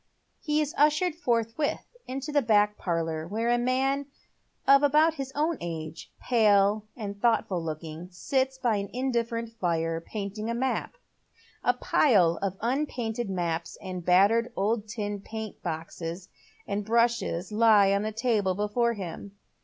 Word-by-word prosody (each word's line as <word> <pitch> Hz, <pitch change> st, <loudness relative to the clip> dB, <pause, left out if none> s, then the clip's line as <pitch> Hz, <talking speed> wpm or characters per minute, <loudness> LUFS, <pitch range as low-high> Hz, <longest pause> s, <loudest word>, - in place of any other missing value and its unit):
He 300 Hz, -1 st, +1 dB
is 300 Hz, -1 st, -2 dB
ushered 300 Hz, +4 st, +3 dB
forthwith 240 Hz, -2 st, -1 dB, 0.2 s
into 270 Hz, +3 st, -4 dB
the 290 Hz, -1 st, +3 dB
back 210 Hz, -3 st, +3 dB
pailour, 165 Hz, -3 st, -2 dB
where 225 Hz, +5 st, -1 dB
a 240 Hz, -, +3 dB
man 265 Hz, +3 st, 0 dB, 0.6 s
of 275 Hz, 0 st, +7 dB
about 305 Hz, +3 st, +4 dB
his 275 Hz, -3 st, -5 dB
own 310 Hz, +3 st, 0 dB
age, 160 Hz, -2 st, -6 dB
pale 210 Hz, -2 st, +3 dB
and 200 Hz, -3 st, -6 dB
thoughtful 210 Hz, -7 st, +1 dB
looking, 160 Hz, +2 st, -6 dB
sits 265 Hz, +8 st, -1 dB
by 240 Hz, -5 st, +1 dB
an 200 Hz, 0 st, -4 dB
indifferent 235 Hz, -2 st, -1 dB
fire 165 Hz, -2 st, 0 dB
painting 210 Hz, +3 st, -5 dB
a 235 Hz, -, -1 dB
map. 260 Hz, -, -2 dB, 0.7 s
A -, -, +3 dB
pile 180 Hz, -, +3 dB
of 195 Hz, -1 st, -2 dB
unpainted 240 Hz, -3 st, -2 dB
maps, 170 Hz, -3 st, -2 dB
a 185 Hz, -2 st, -7 dB
battered 200 Hz, +7 st, +3 dB
old 215 Hz, +2 st, 0 dB
tin 205 Hz, -1 st, -4 dB
paint 220 Hz, 0 st, -7 dB
box 165 Hz, 0 st, -5 dB, 0.7 s
and 205 Hz, +1 st, -2 dB
brushes 230 Hz, -5 st, +1 dB
lie 210 Hz, -2 st, +5 dB
on 200 Hz, -, +1 dB
the 215 Hz, +1 st, -2 dB
table 215 Hz, -5 st, 0 dB
before 210 Hz, +4 st, +1 dB
him. 200 Hz, 0 st, -7 dB
220 Hz, 145 wpm, -27 LUFS, 190-250 Hz, 0.7 s, of